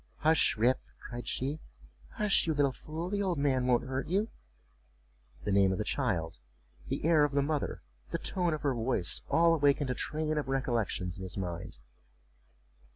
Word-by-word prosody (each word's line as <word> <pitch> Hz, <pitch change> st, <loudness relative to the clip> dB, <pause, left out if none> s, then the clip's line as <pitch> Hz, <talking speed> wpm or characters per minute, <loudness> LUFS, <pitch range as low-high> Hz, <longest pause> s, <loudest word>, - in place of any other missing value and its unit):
"Hush, 160 Hz, -6 st, +4 dB
Rip," 120 Hz, +4 st, +3 dB, 0.2 s
cried 120 Hz, -1 st, -8 dB
she, 140 Hz, +4 st, -1 dB, 0.5 s
"hush, 210 Hz, -4 st, +3 dB
you 160 Hz, -, +1 dB
little 140 Hz, -2 st, +3 dB
fool; 160 Hz, +7 st, -6 dB
the 205 Hz, 0 st, 0 dB
old 185 Hz, -4 st, 0 dB
man 130 Hz, -3 st, +1 dB
won't 125 Hz, -1 st, +3 dB
hurt 130 Hz, +1 st, -3 dB
you." 200 Hz, +6 st, 0 dB, 1.1 s
The 105 Hz, -, -1 dB
name 100 Hz, -1 st, +4 dB
of 95 Hz, -, -1 dB
the -, -, -1 dB
child, 80 Hz, -5 st, -1 dB, 0.5 s
the -, -, -3 dB
air 160 Hz, -2 st, +5 dB
of 145 Hz, -1 st, +1 dB
the 140 Hz, 0 st, +2 dB
mother, 150 Hz, 0 st, -2 dB, 0.3 s
the -, -, -1 dB
tone 175 Hz, -4 st, +1 dB
of 150 Hz, -, -9 dB
her 140 Hz, -2 st, +2 dB
voice, 115 Hz, -7 st, 0 dB
all 165 Hz, 0 st, +5 dB
awakened 145 Hz, -3 st, +2 dB
a -, -, +1 dB
train 155 Hz, +3 st, -1 dB
of 145 Hz, -, -4 dB
recollections 115 Hz, -9 st, -1 dB
in 95 Hz, -, -7 dB
his 95 Hz, 0 st, -6 dB
mind. 90 Hz, -7 st, -5 dB
140 Hz, 175 wpm, -31 LUFS, 120-155 Hz, 1.1 s, air